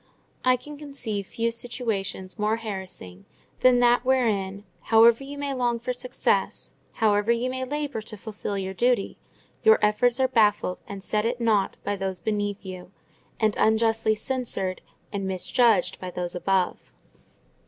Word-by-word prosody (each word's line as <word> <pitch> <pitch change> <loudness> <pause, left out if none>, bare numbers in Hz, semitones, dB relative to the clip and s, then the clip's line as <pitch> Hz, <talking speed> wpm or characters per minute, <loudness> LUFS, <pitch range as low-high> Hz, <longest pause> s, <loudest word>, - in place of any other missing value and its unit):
I 255 0 +5
can 295 +4 -9
conceive 250 -9 -5
few 230 0 -1
situations 225 -5 -3
more 215 +2 +1
harassing 190 - -7 0.3
than 255 -1 +5
that 245 0 +4
wherein, 205 -7 +1 0.2
however 230 +3 +6
you 285 +1 -8
may 285 -1 -2
long 245 -2 0
for 240 +2 -3
success, 250 0 -1 0.2
however 210 0 +2
you 240 +2 0
may 260 0 -3
labour 290 -3 -3
to 215 0 -8
fulfil 205 -1 -5
your 190 0 -3
duty, 240 +1 +1 0.4
your 445 0 +7
efforts 240 +4 +2
are 260 - +4
baffled 210 -6 +2
and 200 -1 -7
set 210 +1 0
at 245 +1 -2
nought 215 -4 +1
by 205 - -1
those 190 -1 -3
beneath 205 +1 -2
you, 185 -1 -8 0.5
and 215 -2 +2
unjustly 220 0 +3
censured 215 -6 -2 0.3
and 195 -1 -2
misjudged 190 +2 +2
by 185 - -5
those 175 -1 -4
above. 185 0 -1
220 Hz, 150 wpm, -25 LUFS, 195-245 Hz, 0.5 s, your